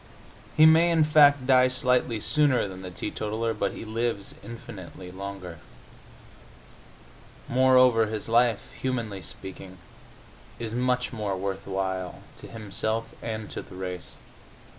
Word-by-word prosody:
He 155 - +8
may, 160 +2 +6
in 165 -2 +4
fact, 145 -3 +5
die 130 -1 +5
slightly 125 -2 +1
sooner 145 -2 +3
than 95 -1 -9
the 90 - -7
teetotaler, 110 +5 -3
but 105 - -2
he - - -8
lives 110 -2 -2
infinitely 100 -5 -9
longer. 95 -3 -7 1.9
Moreover, 125 -3 +5
his 105 -1 -4
life, 115 -1 +2
humanly 115 -7 -2
speaking, 95 +2 -10 0.8
is 115 -1 -5
much 125 +1 0
more 105 -4 -2
worth 95 0 -4
while, 95 -1 -3 0.2
to - - -10
himself 110 +1 -3
and 110 -2 -4
to - - -5
the - - -13
race. 90 -1 -6
115 Hz, 125 wpm, -26 LUFS, 95-125 Hz, 1.9 s, He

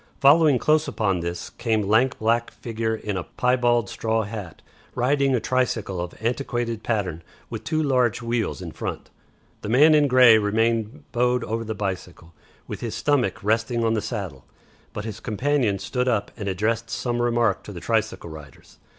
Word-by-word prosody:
Following 145 0 +6
close 155 +4 +2
upon 100 -5 0
this 85 +1 -5
came 110 -3 0
lank 110 +6 +2
black 115 +2 +1
figure 110 -1 -3
in 105 -3 -4
a 90 - -3
piebald 120 -2 +1
straw 110 +2 -1
hat, 100 -5 -8 0.3
riding 135 +1 +2
a - - +1
tricycle 110 -6 -1
of 90 0 -6
antiquated 120 -1 -2
pattern 95 -9 -2 0.3
with - - -5
two 155 -1 0
large 125 -6 +2
wheels 115 - -2
in - - -6
front. - - -6 0.5
The 105 - -5
man 145 +7 +6
in 150 -1 +5
grey 125 -4 +7
remained 110 +1 0
bowed 125 0 +1
over 115 +2 -3
the 110 -1 -4
bicycle, 90 -4 -5 0.3
with - - -6
his 115 -2 -4
stomach 125 -9 0
resting 115 +2 +1
on 115 0 +2
the 110 - 0
saddle, 95 - -5 0.5
but 105 - -6
his 110 -3 -6
companion 125 -2 0
stood 125 +5 -2
up 110 -5 0
and 105 -4 -4
addressed 115 +4 -1
some 120 -1 -2
remark 120 -4 +1
to - - -8
the - - -7
tricycle 85 - -1
riders. 75 -4 -13
115 Hz, 170 wpm, -24 LUFS, 105-125 Hz, 0.5 s, grey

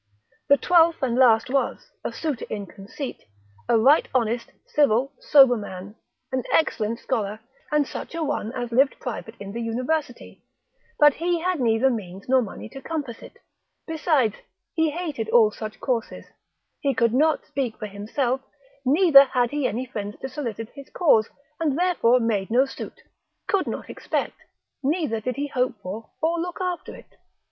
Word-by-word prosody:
The 280 - +7
twelfth 335 -1 +4
and 250 -3 +1
last 235 -4 +5
was 270 +1 -1
(a - - -3
suitor 300 -7 -3
in 205 -2 -4
conceit) 200 +9 -8 0.5
a 235 - +5
right 270 +7 +5
honest, 235 -1 0
civil, 275 -1 +2
sober 270 -4 +6
man, 205 -1 -7 0.4
an 260 0 0
excellent 230 -8 +1
scholar, 215 -5 -2 0.3
and 300 -1 +3
such - - -7
a 335 - -1
one 225 -6 -2
as 245 -2 -4
lived 270 +4 +3
private 235 -2 -6
in 200 -1 -7
the 235 +3 -4
university, 250 +4 -3 0.5
but 295 -1 +7
he 340 +2 -1
had 365 -1 0
neither 235 +2 +3
means 195 -4 -6
nor 260 0 +4
money 220 -1 -7
to 270 - -10
compass 285 -7 -5
it; - - -13 0.5
besides 305 - +1 0.4
he 320 -2 +2
hated 300 -9 -4
all 220 -3 +5
such 215 0 -7
courses, 245 -4 -2 0.5
he 275 -2 0
could 235 -2 +2
not 310 +4 +2
speak 270 -6 -3
for 215 - -5
himself, 235 +6 -2 0.4
neither 280 0 +7
had 245 -3 0
he 290 -3 0
any 240 +5 -3
friends 210 -4 -5
to 265 - -4
solicit 230 -5 -5
his 280 -1 -12
cause, 230 - +3 0.3
and 305 -4 0
therefore 335 -9 +3
made 215 -5 0
no 250 +4 +4
suit, 270 - -9 0.4
could 395 -3 +1
not - - -4
expect, - - -3 0.5
neither 280 -6 0
did 250 +3 -3
he 285 - -2
hope 255 -2 0
for, 210 +5 -6
or 335 +1 +1
look 355 +1 -4
after 360 -2 -3
it. - - -17
255 Hz, 165 wpm, -24 LUFS, 225-295 Hz, 0.5 s, The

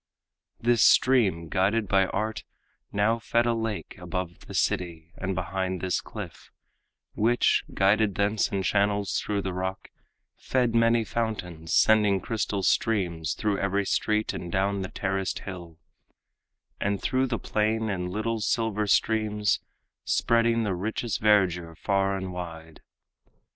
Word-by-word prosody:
This 120 -1 +3
stream, 100 -11 +4
guided 100 +6 +1
by 95 0 +3
art, 110 +1 -3 0.5
now 110 +3 +1
fed 115 +1 +1
a 120 - +2
lake 110 -2 -4
Above 90 0 -5
the - - -8
city 85 -2 -1
and 95 0 -3
behind 95 +1 -2
this 90 0 -1
cliff, - - -9 0.6
Which, 120 +3 +2
guided 100 +1 +2
thence 105 +1 +1
in 100 -2 -1
channels 100 +1 +1
through 100 -2 -2
the 95 - -3
rock, 95 +1 -4 0.5
Fed 125 -3 0
many 115 0 +3
fountains, 90 -8 -3
sending 105 -3 +4
crystal 100 -2 -2
streams 90 -10 0
Through 105 -2 -1
every 100 0 0
street 105 +2 0
and 85 - -6
down 100 +1 0
the 95 - -4
terraced 95 -1 -2
hill, 85 -4 -8 1.0
And 100 -1 0
through 130 +1 0
the 120 -2 -1
plain 110 +1 0
in 90 -2 -3
little 110 +4 -2
silver 105 0 0
streams, 105 0 +2 0.4
Spreading 115 0 +2
the 100 -3 -1
richest 110 +5 -3
verdure 90 -6 +2
far 95 0 0
and 95 -1 -5
wide. 80 -2 -8
100 Hz, 135 wpm, -27 LUFS, 95-110 Hz, 1.0 s, stream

